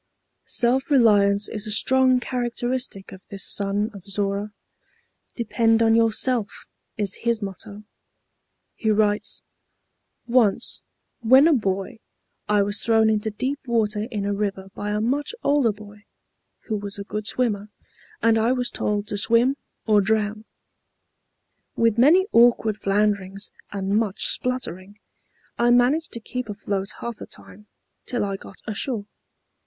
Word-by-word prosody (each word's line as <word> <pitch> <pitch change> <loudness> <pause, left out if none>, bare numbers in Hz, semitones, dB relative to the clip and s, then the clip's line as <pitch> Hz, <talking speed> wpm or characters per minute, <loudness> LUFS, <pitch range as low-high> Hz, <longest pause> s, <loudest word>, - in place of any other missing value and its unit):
Self 255 +4 +1
reliance 205 -6 +4
is 215 0 -5
a - - -2
strong 255 +4 +3
characteristic 245 -3 -3
of 190 - -11
this 195 -1 -5
son 205 +2 -1
of 200 -1 -12
Zorra. 200 +1 -2 0.8
Depend 230 -1 +2
on 225 0 +4
yourself, 230 0 +1 0.3
is 205 -2 -2
his 230 -2 0
motto. 200 +2 -8 0.9
He 220 - -2
writes: 210 -1 +1 0.8
"Once, 235 -4 +1 0.4
when 260 +6 +6
a 330 - +5
boy, 195 -3 -2 0.5
I 205 -1 +4
was 205 +1 -3
thrown 220 -1 +4
into 215 0 0
deep 260 +7 -3
water 215 -2 0
in 205 -5 -3
a 205 - 0
river 195 -2 -3
by 205 - -5
a 210 0 0
much 280 - -1
older 280 -5 +3
boy, 210 0 -14 0.6
who 215 - -3
was 200 0 -6
a 200 - -5
good 210 +1 -5
swimmer, 210 -5 -1 0.5
and 225 -1 +4
I 230 +3 +2
was 250 -1 -1
told 205 -1 -1
to 205 - -2
swim 235 +5 +3 0.3
or 210 -2 +4
drown. 215 +1 -1 1.3
With 230 -1 +2
many 330 +9 +6
awkward 230 -3 +4
flounderings, 200 -1 0 0.2
and 195 0 -2
much 210 -4 -1
spluttering, 205 -6 -3 0.6
I 240 - +4
managed 250 +7 +3
to 235 - -3
keep 250 +1 -5
afloat 200 -1 -3
half 235 -2 -5
the - - -9
time, 210 +1 -12 0.4
till 245 -4 -1
I 195 -1 -3
got 195 - -12
ashore. 215 0 -3
215 Hz, 140 wpm, -23 LUFS, 205-240 Hz, 1.3 s, when